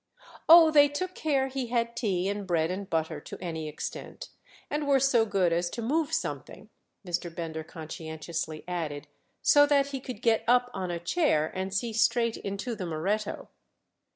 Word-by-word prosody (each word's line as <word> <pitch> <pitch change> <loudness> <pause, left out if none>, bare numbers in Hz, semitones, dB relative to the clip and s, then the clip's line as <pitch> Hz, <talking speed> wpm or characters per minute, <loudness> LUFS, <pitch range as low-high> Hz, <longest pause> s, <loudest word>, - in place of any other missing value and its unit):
"Oh, 330 -1 +9
they 290 -1 +6
took 365 +6 -4
care 275 -6 0
he 265 -2 -4
had 235 0 -1
tea 190 -6 0
and 200 -1 -3
bread 165 -1 +1
and 195 +1 -5
butter 160 -1 -1
to - - -9
any 160 -3 -4
extent; 150 - -7 0.4
and 295 0 -2
were 275 -1 +4
so 250 -4 +3
good 190 -4 +2
as 175 +1 0
to 235 - -5
move 305 +6 0
something," 325 - -4 0.4
Mr. 175 0 -2
Bender 165 -1 -5
conscientiously 160 0 -6
added, 160 -5 -4 0.4
"so 290 -1 +6
that 280 -1 +3
he 275 -1 -4
could 250 -4 -8
get 225 -2 +3
up 245 +1 +3
on 185 -2 -3
a 175 - -2
chair 170 - +1
and 190 +1 -3
see 220 +4 -2
straight 230 +1 +2
into 200 +4 -4
the 185 -4 -5
Moretto." 195 +7 -2
205 Hz, 175 wpm, -28 LUFS, 170-265 Hz, 0.4 s, Oh